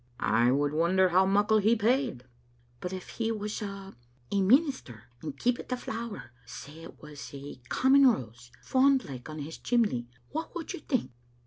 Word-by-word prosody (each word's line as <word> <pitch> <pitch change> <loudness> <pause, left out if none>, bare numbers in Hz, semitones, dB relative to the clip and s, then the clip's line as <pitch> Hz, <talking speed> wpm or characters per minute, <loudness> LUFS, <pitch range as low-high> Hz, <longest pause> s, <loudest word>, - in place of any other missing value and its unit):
" 120 0 -34 0.2
I 120 +1 +5
would 145 +2 +1
wonder 180 +4 +3
how 185 +2 +4
muckle 205 +2 +3
he 220 +3 +4
paid. 235 - +1 0.2
" 120 0 -35
" 120 0 -35
But 180 - -4
if 185 -1 -6
he 225 -1 -2
was 210 0 -4
a 195 -1 -7 0.2
— 125 -1 -34
a 200 -1 +2
minister, 245 - +2 0.2
and 150 -3 -6
keepit 245 0 -1
the 250 - -1
flower 230 - -6
— 125 - -31
say 150 +6 -10
it 165 - -12
was 150 -2 -9
a 140 -1 -9
common 270 +1 +5
rose 120 - -1
— - - -26
^fond^like 260 - +2
on 155 - -7
his 155 +2 -7
chimley, 210 - +1 0.2
what 320 +3 -5
would 340 +2 -5
you 360 - -6
think?" 250 - -2
190 Hz, 200 wpm, -29 LUFS, -, 0.2 s, I